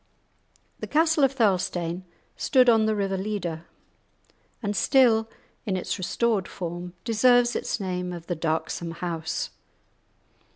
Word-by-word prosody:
The - - -5
castle 320 -1 +3
of 270 0 +4
Thirlestane 185 -5 0 0.3
stood 255 -2 +4
on 220 -2 +4
the 215 - +1
river 195 -2 -1
Leader, 185 -5 -4 1.0
and 205 0 -1
still, 225 -3 +4 0.4
in 190 -2 0
its 185 - -3
restored 210 +1 0
form, 175 0 -6
deserves 240 +1 +4
its - - -2
name 180 -2 -3
of 170 -2 -7
"the 175 - -2
darksome 165 +1 -2
house." 165 -2 -3
195 Hz, 125 wpm, -26 LUFS, 175-230 Hz, 1.0 s, of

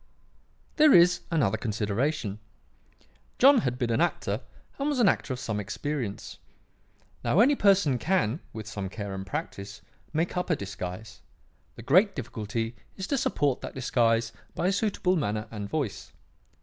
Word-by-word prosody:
"There 305 -2 +7
is 175 +1 +6
another 115 - +1
consideration. 110 +1 -1 1.0
John 270 0 +7
had 125 - -1
been 120 -2 -1
an 115 - +2
actor 115 -10 0 0.4
and 280 +2 0
was 285 -3 0
an 230 - +5
actor 160 - +1
of 125 - -3
some 110 -3 -3
experience. 120 +1 -4 0.8
Now, - - +2
any 260 +6 +6
person 195 - +3
can, 160 - +1
with 110 -1 -7
some 100 -3 -4
care 100 -1 -6
and 95 0 -6
practice, 100 +1 -6 0.3
make 160 +3 -1
up 180 0 -2
a 165 - +3
disguise; 100 0 -7 0.5
the 115 - -10
great 185 - +4
difficulty 115 -2 -4 0.2
is 190 - -3
to 280 - 0
support 145 - 0
that - - -7
disguise 115 -3 +1 0.2
by - - -1
a 185 - +3
suitable 195 -2 +1
manner 110 - -1
and 105 -2 -5
voice. 140 -10 -3
125 Hz, 155 wpm, -27 LUFS, 105-180 Hz, 1.0 s, There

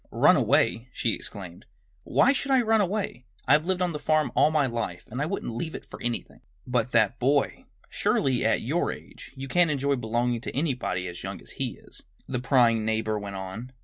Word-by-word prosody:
"Run - - +5
away!" 115 +2 +2
she 115 - 0
exclaimed. 90 -4 -8 0.4
"Why 275 - +4
should 275 0 -3
I 260 -2 +4
run 220 -1 +3
away? 195 -9 -2 0.2
I've 155 +3 +4
lived 185 -1 +1
on 175 -2 -1
the 150 - -4
farm 155 -4 +1
all 150 - +5
my 155 -2 +2
life 115 -8 -4
and 125 +4 -3
I 150 - 0
wouldn't 170 - -3
leave 160 +6 -4
it - - -8
for - - -11
anything." 120 -1 -4 0.2
"But 125 -1 0
that 110 -3 +3
boy! 140 +3 +1 0.2
Surely, 130 -3 +1
at - - +2
your - - 0
age, - - -11
you 135 0 -6
can't 175 +4 +3
enjoy 140 -1 +1
belonging 120 0 -1
to - - -6
anybody 125 - -1
as 85 0 -7
young - - -5
as - - -12
he - - -4
is!" - - -10 0.3
the 125 -2 -2
prying 120 -3 +3
neighbor 110 -1 0
went 100 -1 -6
on. 95 +7 -7
125 Hz, 205 wpm, -27 LUFS, 110-155 Hz, 0.4 s, Run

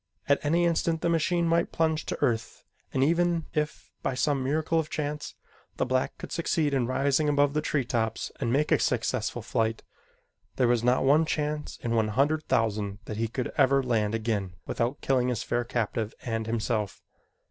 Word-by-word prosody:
At 140 - +2
any 170 +4 +2
instant 165 -1 +1
the 170 - +1
machine 170 +1 +2
might 170 +1 +2
plunge 160 -1 0
to - - -3
earth 115 -1 -1 0.3
and 130 - +1
even 170 +2 +2
if, 150 0 -3
by 130 - -1
some 140 0 +1
miracle 155 +4 +1
of 155 -1 -2
chance, 150 0 -4 0.4
the - - +1
black 130 0 0
could - - -8
succeed 160 -3 0
in 130 -3 +1
rising 140 +3 +2
above 145 -1 +3
the 150 - +1
tree 145 -4 0
tops 115 -3 -1
and 115 - 0
make 145 +4 +1
a - - +5
successful - - -1
flight, 110 0 -1 0.7
there 125 - +3
was 120 -1 +2
not 125 +1 +3
one 150 +4 +4
chance 150 -1 -2
in 120 - -1
one 110 -2 +2
hundred 145 +8 +1
thousand 105 -2 0
that 105 - -5
he 115 +1 0
could 125 +2 -3
ever 135 0 +4
land 110 -3 +1
again 105 -5 -2
without 120 +4 -2
killing 130 -2 +2
his 125 -4 -1
fair 120 +1 0
captive 115 -2 -2
and 115 -2 -2
himself. 110 -2 -2
135 Hz, 185 wpm, -28 LUFS, 115-150 Hz, 0.7 s, a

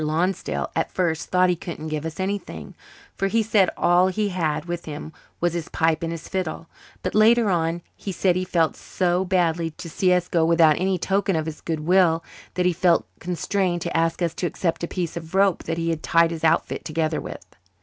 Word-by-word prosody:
Lonsdale 165 +5 -1
at - - -1
first 170 -3 -1
thought 180 0 +3
he - - +1
couldn't 160 -2 -7
give 155 +1 -3
us 160 +2 -8
anything, 190 - -4 0.4
for 195 - -1
he 225 +3 +2
said 205 -4 +3
all 175 +1 +4
he 205 +2 0
had 165 -5 -1
with 175 0 -5
him 155 +1 -7 0.3
was 175 -1 +1
his 170 -2 -4
pipe 160 -1 +1
and 165 0 -2
his 165 -2 -7
fiddle; 170 -3 -3 0.4
but 185 - -2
later 220 0 +5
on 170 0 0
he 200 - -5
said 180 -1 +1
he 185 - 0
felt 170 -3 +1
so 180 0 0
badly 170 -3 +1
to 170 +3 -10
see 185 +2 +2
us 180 -1 +2
go 165 -2 +2
without 165 -2 +4
any 190 0 +1
token 195 +1 0
of 160 -1 -1
his 160 -1 -6
good 160 -2 -3
will 170 0 +3 0.3
that 180 - +1
he 180 - +3
felt 175 0 +3
constrained 180 0 -1
to 170 - -4
ask 165 +2 +1
us 165 -2 0
to 175 - -2
accept 170 -1 -2
a - - 0
piece 175 -2 -3
of 165 +1 -7
rope 195 -2 +3
that 165 0 -2
he 165 0 0
had 160 -1 -3
tied 165 0 +3
his 165 -1 -6
outfit 160 - +1
together 155 0 -1
with. - - -8
175 Hz, 215 wpm, -23 LUFS, 165-185 Hz, 0.4 s, later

